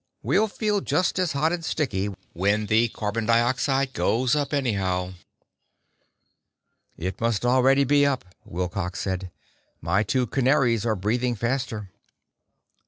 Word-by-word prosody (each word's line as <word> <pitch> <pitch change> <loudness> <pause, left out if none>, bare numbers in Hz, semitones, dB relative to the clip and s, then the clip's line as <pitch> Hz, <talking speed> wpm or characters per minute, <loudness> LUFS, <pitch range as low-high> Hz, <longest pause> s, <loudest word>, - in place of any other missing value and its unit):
We'll 220 - +2
feel 210 -1 -1
just 185 0 0
as 180 -3 0
hot 155 +4 +1
and 170 -1 -3
sticky 105 -12 -1 0.3
when 100 +4 +1
the 110 +3 +3
carbon 110 0 -3
dioxide 130 +3 +2
goes 125 +4 +1
up, 145 -2 -1
anyhow." 95 -10 -1 1.8
"It 90 +4 -5
must 115 -1 0
already 130 +2 +4
be 145 +2 +3
up," 140 -7 +1 0.2
Wilcox 90 +1 -4
said. 95 -1 -3 0.5
"My 85 +6 +1
two 125 +4 0
canaries 125 -3 +2
are 110 - +1
breathing 120 +5 0
faster." 115 -4 -3
120 Hz, 125 wpm, -25 LUFS, 100-135 Hz, 1.8 s, already